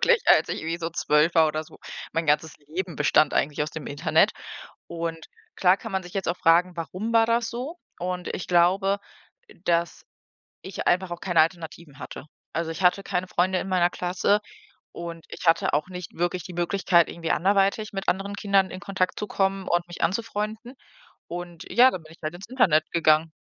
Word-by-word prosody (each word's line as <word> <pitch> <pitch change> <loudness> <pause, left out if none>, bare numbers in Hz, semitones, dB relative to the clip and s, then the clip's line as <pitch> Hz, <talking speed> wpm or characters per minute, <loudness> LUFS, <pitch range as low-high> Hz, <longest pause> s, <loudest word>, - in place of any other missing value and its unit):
wirklich, 485 -1 +4
als - - +5
ich - - -3
irgendwie 165 +2 -3
so 165 0 -3
12 150 0 +2
war 160 -2 +6
oder 155 +1 -3
so. - - -17 0.3
Mein 165 0 -1
ganzes 150 +2 +1
Leben 165 +3 -5
bestand 150 0 +3
eigentlich 150 +1 +1
aus 150 - -3
dem 160 -1 -7
Internet 145 0 +2 0.6
und 165 -1 -5 0.3
klar 185 +1 +4
kann 225 +2 -8
man 190 -1 -1
sich 175 - -12
jetzt 195 -2 -2
auch 180 - -1
fragen: 175 +2 +3
warum 185 +7 -4
war 225 0 +5
das 230 0 +1
so? 260 +9 -6 0.2
Und 180 0 -3
ich 175 - -6
glaube, 190 +3 +3 0.5
äh, - - -17
dass 170 0 0 0.6
ich 190 - -6
einfach 180 +1 +2
auch 175 0 -6
keine 175 -4 +2
Alternativen 160 -3 -2
hatte. 135 +1 -9 0.3
Also, 165 0 -2
ich 165 - -5
hatte 180 +2 +4
keine 185 -2 -2
Freunde 185 +1 +1
in - - -5
meiner 180 -2 +3
Klasse 185 +4 +1 0.5
und 170 -1 -7
ich - - -8
hatte 165 -1 +3
auch 150 +3 +1
nicht 180 -2 -8
wirklich 175 0 -1
die 180 - -9
Möglichkeit, 175 0 +2
irgendwie 165 -1 -3
anderweitig 200 +3 +1
mit 195 0 -4
anderen 195 +2 -2
Kindern 200 -2 +2
in 185 - -7
Kontakt 190 -2 -2
zu 210 - -3
kommen 195 -1 -1
und 175 0 +1
mich 175 - -9
anzufreunden. 220 +3 -2 0.5
Und 175 -1 -7
ja, 255 +2 +6
dann 185 - -5
bin 155 - -16
ich - - -18
halt 155 +1 -3
ins 190 +4 -10
Internet 165 - +3
gegangen. 160 -1 +3
175 Hz, 195 wpm, -25 LUFS, 165-195 Hz, 0.6 s, war